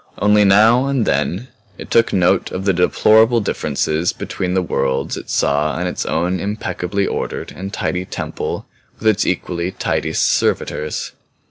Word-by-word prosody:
Only 105 Hz, 0 st, +4 dB
now 110 Hz, +6 st, +5 dB
and 135 Hz, -5 st, 0 dB
then 85 Hz, -, -1 dB, 0.3 s
it -, -, -10 dB
took 115 Hz, 0 st, +3 dB
note 90 Hz, 0 st, +2 dB
of 95 Hz, +1 st, -5 dB
the 95 Hz, -, +3 dB
deplorable 110 Hz, +6 st, +4 dB
differences 85 Hz, -5 st, -1 dB
between 90 Hz, 0 st, -3 dB
the 95 Hz, -, +2 dB
worlds 65 Hz, -6 st, -1 dB
it -, -, -9 dB
saw 75 Hz, +2 st, +1 dB
and 90 Hz, +1 st, -1 dB
its 90 Hz, -, -3 dB
own 90 Hz, +1 st, 0 dB
impeccably 100 Hz, -1 st, -2 dB
ordered -, -, -4 dB
and 95 Hz, +1 st, -6 dB
tidy 90 Hz, -3 st, -2 dB
temple -, -, -5 dB, 0.3 s
with 110 Hz, -, -3 dB
its 110 Hz, -3 st, +3 dB
equally 85 Hz, 0 st, -2 dB
tidy -, -, -2 dB
servitors. 75 Hz, 0 st, 0 dB
95 Hz, 150 wpm, -18 LUFS, 90-105 Hz, 0.3 s, now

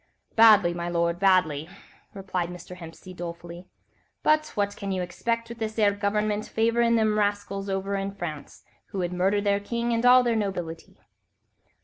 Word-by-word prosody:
"Badly, 215 Hz, -6 st, +6 dB
my 175 Hz, 0 st, -4 dB
lord, 170 Hz, 0 st, 0 dB
badly," 175 Hz, -5 st, +2 dB, 0.5 s
replied 185 Hz, -3 st, -3 dB
Mr. 180 Hz, 0 st, -9 dB
Hempseed, 180 Hz, +1 st, -11 dB
dolefully, 170 Hz, +1 st, -8 dB, 0.6 s
"but 310 Hz, 0 st, +3 dB
what 205 Hz, -1 st, -1 dB
can 200 Hz, -2 st, -5 dB
you 185 Hz, -1 st, -1 dB
'xpect 230 Hz, +6 st, -3 dB
with 235 Hz, 0 st, -9 dB
this 220 Hz, 0 st, -4 dB
'ere 210 Hz, -2 st, +4 dB
government 210 Hz, +1 st, -1 dB
favourin' 230 Hz, +1 st, +2 dB
them 215 Hz, -1 st, +2 dB
rascals 205 Hz, -1 st, -2 dB
over 195 Hz, +1 st, -2 dB
in 195 Hz, 0 st, -2 dB
France, 155 Hz, -6 st, -7 dB, 0.2 s
who -, -, -8 dB
would 180 Hz, -1 st, -2 dB
murder 190 Hz, +3 st, +1 dB
their 200 Hz, -1 st, +1 dB
king 235 Hz, +3 st, -2 dB
and 230 Hz, 0 st, 0 dB
all 250 Hz, 0 st, +7 dB
their 235 Hz, -2 st, +1 dB
nobility." 180 Hz, -6 st, -4 dB
200 Hz, 160 wpm, -26 LUFS, 175-215 Hz, 0.6 s, all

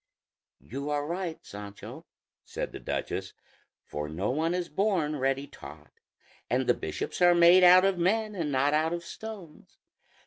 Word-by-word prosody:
"You 140 Hz, +4 st, -6 dB
are 145 Hz, 0 st, -1 dB
right, 170 Hz, 0 st, -3 dB
Sancho," 100 Hz, 0 st, -10 dB, 0.4 s
said -, -, -5 dB
the -, -, -8 dB
duchess; -, -, -4 dB, 0.5 s
"for 75 Hz, 0 st, -5 dB
no 90 Hz, +9 st, -2 dB
one 160 Hz, +5 st, 0 dB
is 180 Hz, -1 st, -2 dB
born 170 Hz, -5 st, 0 dB
ready 135 Hz, +1 st, 0 dB
taught, -, -, -13 dB, 0.6 s
and -, -, +1 dB
the -, -, +4 dB
bishops 430 Hz, -, -5 dB
are 175 Hz, 0 st, +6 dB
made 175 Hz, +2 st, +7 dB
out 180 Hz, +1 st, +8 dB
of 195 Hz, -2 st, +1 dB
men 210 Hz, +4 st, +1 dB
and 165 Hz, -7 st, -3 dB
not 140 Hz, +2 st, +2 dB
out 160 Hz, +2 st, +1 dB
of 170 Hz, 0 st, -4 dB
stones. 195 Hz, -5 st, -10 dB
165 Hz, 160 wpm, -28 LUFS, 145-185 Hz, 0.6 s, out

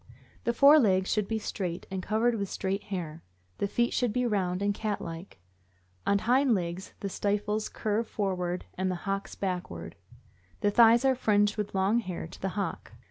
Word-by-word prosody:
The 235 Hz, -, +2 dB
fore 285 Hz, +5 st, +7 dB
legs 190 Hz, -6 st, +2 dB
should 210 Hz, -2 st, 0 dB
be 225 Hz, -, -1 dB
straight, 180 Hz, -5 st, -4 dB
and 190 Hz, -1 st, -2 dB
covered 220 Hz, +5 st, +1 dB
with 200 Hz, -4 st, -2 dB
straight 195 Hz, +1 st, -2 dB
hair; 170 Hz, -5 st, -5 dB, 0.4 s
the 200 Hz, -, +1 dB
feet 235 Hz, +4 st, 0 dB
should 245 Hz, -3 st, +1 dB
be 250 Hz, +3 st, 0 dB
round 190 Hz, -4 st, 0 dB
and 205 Hz, 0 st, +2 dB
cat 210 Hz, 0 st, -2 dB
like. 165 Hz, -, -8 dB, 0.7 s
On 200 Hz, -, +4 dB
hind 250 Hz, +4 st, +3 dB
legs 175 Hz, +1 st, -4 dB
the 200 Hz, -, -2 dB
stifles 210 Hz, +2 st, -1 dB
curve 220 Hz, +1 st, -1 dB
forward 180 Hz, -3 st, -2 dB
and 185 Hz, 0 st, -1 dB
the 185 Hz, -, -1 dB
hocks 195 Hz, 0 st, -3 dB
backward; 185 Hz, -2 st, -4 dB, 0.7 s
the 205 Hz, -2 st, +3 dB
thighs 230 Hz, +3 st, +6 dB
are 265 Hz, -, +5 dB
fringed 205 Hz, -4 st, +2 dB
with 210 Hz, -2 st, -4 dB
long 195 Hz, +5 st, +3 dB
hair 185 Hz, -8 st, -5 dB
to 165 Hz, -, -12 dB
the 195 Hz, -, -1 dB
hock. 190 Hz, -5 st, -3 dB
200 Hz, 185 wpm, -29 LUFS, 185-220 Hz, 0.7 s, fore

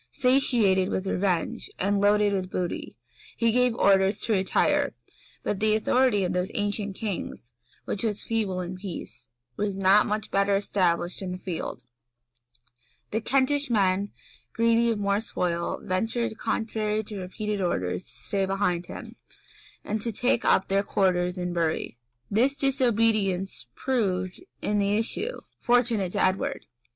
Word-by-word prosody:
Satiated 245 Hz, -8 st, +3 dB
with 190 Hz, -, -2 dB
revenge, 185 Hz, -3 st, -1 dB
and 200 Hz, +1 st, +1 dB
loaded 205 Hz, 0 st, +4 dB
with 185 Hz, -2 st, -2 dB
booty, 180 Hz, -2 st, -3 dB, 0.4 s
he 230 Hz, -1 st, +3 dB
gave 250 Hz, 0 st, +3 dB
orders 195 Hz, -2 st, +4 dB
to 225 Hz, -, 0 dB
retire; 190 Hz, -2 st, +2 dB, 0.5 s
but 195 Hz, -, -1 dB
the 215 Hz, 0 st, +3 dB
authority 220 Hz, -1 st, +3 dB
of 180 Hz, 0 st, -1 dB
those 180 Hz, +1 st, 0 dB
ancient 205 Hz, -2 st, -2 dB
kings, 175 Hz, -, -5 dB, 0.3 s
which 200 Hz, -, -2 dB
was 215 Hz, -3 st, -1 dB
feeble 205 Hz, -5 st, -1 dB
in 180 Hz, +1 st, -5 dB
peace, 165 Hz, -, -8 dB, 0.3 s
was 200 Hz, -2 st, -1 dB
not 195 Hz, +2 st, +5 dB
much 210 Hz, 0 st, -2 dB
better 200 Hz, 0 st, +3 dB
established 180 Hz, -3 st, 0 dB
in 185 Hz, -2 st, -4 dB
the 180 Hz, -, -4 dB
field; 170 Hz, -9 st, -5 dB
and 120 Hz, 0 st, -36 dB
the 220 Hz, -, 0 dB
Kentish 275 Hz, +4 st, +1 dB
men, 200 Hz, -2 st, +2 dB, 0.4 s
greedy 230 Hz, 0 st, +3 dB
of 225 Hz, -, 0 dB
more 200 Hz, 0 st, +1 dB
spoil, 170 Hz, -5 st, -2 dB
ventured, 225 Hz, +5 st, -1 dB
contrary 220 Hz, -1 st, -1 dB
to 205 Hz, -1 st, -7 dB
repeated 205 Hz, +2 st, -3 dB
orders, 90 Hz, -, -1 dB
to -, -, -12 dB
stay 190 Hz, +11 st, -2 dB
behind 185 Hz, -3 st, 0 dB
him, -, -, -9 dB, 0.7 s
and 215 Hz, +1 st, -2 dB
to 230 Hz, -, -2 dB
take 240 Hz, +2 st, +1 dB
up 190 Hz, -, +3 dB
their 195 Hz, +1 st, +2 dB
quarters 185 Hz, -3 st, +1 dB
in 180 Hz, -1 st, -2 dB
Bury. 160 Hz, -7 st, -1 dB, 0.3 s
This 250 Hz, +7 st, +3 dB
disobedience 225 Hz, -, +1 dB
proved, 190 Hz, -, -1 dB, 0.2 s
in 210 Hz, 0 st, +1 dB
the 200 Hz, +1 st, +2 dB
issue, 420 Hz, -, -2 dB, 0.2 s
fortunate 235 Hz, -7 st, +2 dB
to -, -, +1 dB
Edward. 185 Hz, +1 st, 0 dB
200 Hz, 145 wpm, -26 LUFS, 180-220 Hz, 0.7 s, not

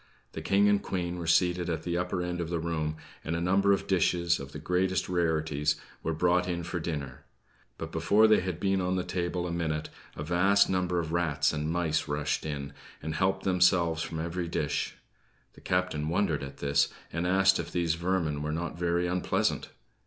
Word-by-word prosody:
The -, -, -6 dB
King 100 Hz, +1 st, +3 dB
and 105 Hz, -1 st, +3 dB
Queen 90 Hz, -1 st, -3 dB
were 85 Hz, -, -5 dB
seated 90 Hz, +1 st, +2 dB
at 80 Hz, -, -2 dB
the 85 Hz, -1 st, -2 dB
upper 90 Hz, 0 st, -1 dB
end 90 Hz, 0 st, -3 dB
of 85 Hz, -, -4 dB
the 85 Hz, -, -1 dB
room; 80 Hz, -2 st, -2 dB, 0.3 s
and 80 Hz, -, -2 dB
a -, -, -1 dB
number 95 Hz, +3 st, +3 dB
of 100 Hz, -, +1 dB
dishes, 85 Hz, -2 st, +2 dB
of 70 Hz, 0 st, -8 dB
the 75 Hz, -, -7 dB
greatest 90 Hz, +4 st, 0 dB
rarities, 80 Hz, -4 st, +1 dB, 0.3 s
were 80 Hz, 0 st, -2 dB
brought 90 Hz, +2 st, +2 dB
in 85 Hz, -1 st, -2 dB
for 90 Hz, +1 st, -3 dB
dinner; 75 Hz, -6 st, -5 dB, 0.5 s
but, 80 Hz, 0 st, -6 dB
before 85 Hz, +7 st, +4 dB
they 110 Hz, -1 st, +6 dB
had 90 Hz, -2 st, -3 dB
been 95 Hz, 0 st, +1 dB
on 90 Hz, +1 st, 0 dB
the 90 Hz, -, 0 dB
table 90 Hz, 0 st, -2 dB
a 85 Hz, -, -3 dB
minute, 80 Hz, -2 st, -2 dB, 0.3 s
a 75 Hz, -, -5 dB
vast 95 Hz, +5 st, +3 dB
number 90 Hz, -1 st, 0 dB
of 80 Hz, -2 st, -2 dB
rats 80 Hz, -5 st, +1 dB
and 75 Hz, 0 st, -2 dB
mice 80 Hz, -2 st, 0 dB
rushed 75 Hz, +1 st, -1 dB
in, 70 Hz, -2 st, -5 dB, 0.3 s
and 80 Hz, +1 st, -3 dB
helped 95 Hz, +4 st, 0 dB
themselves 90 Hz, -3 st, +3 dB
from 80 Hz, -1 st, -4 dB
every 85 Hz, +2 st, -3 dB
dish. 75 Hz, -3 st, -2 dB, 0.6 s
The -, -, -17 dB
captain 90 Hz, -5 st, -1 dB
wondered 85 Hz, -3 st, +1 dB
at 70 Hz, 0 st, -7 dB
this, 70 Hz, 0 st, +2 dB, 0.3 s
and 85 Hz, +2 st, -1 dB
asked 95 Hz, +1 st, +4 dB
if 85 Hz, 0 st, -4 dB
these 85 Hz, -3 st, +1 dB
vermin 85 Hz, -4 st, -1 dB
were 75 Hz, +1 st, -2 dB
not 85 Hz, +1 st, -4 dB
very 85 Hz, 0 st, +1 dB
unpleasant. 90 Hz, 0 st, 0 dB
85 Hz, 195 wpm, -29 LUFS, 80-90 Hz, 0.6 s, they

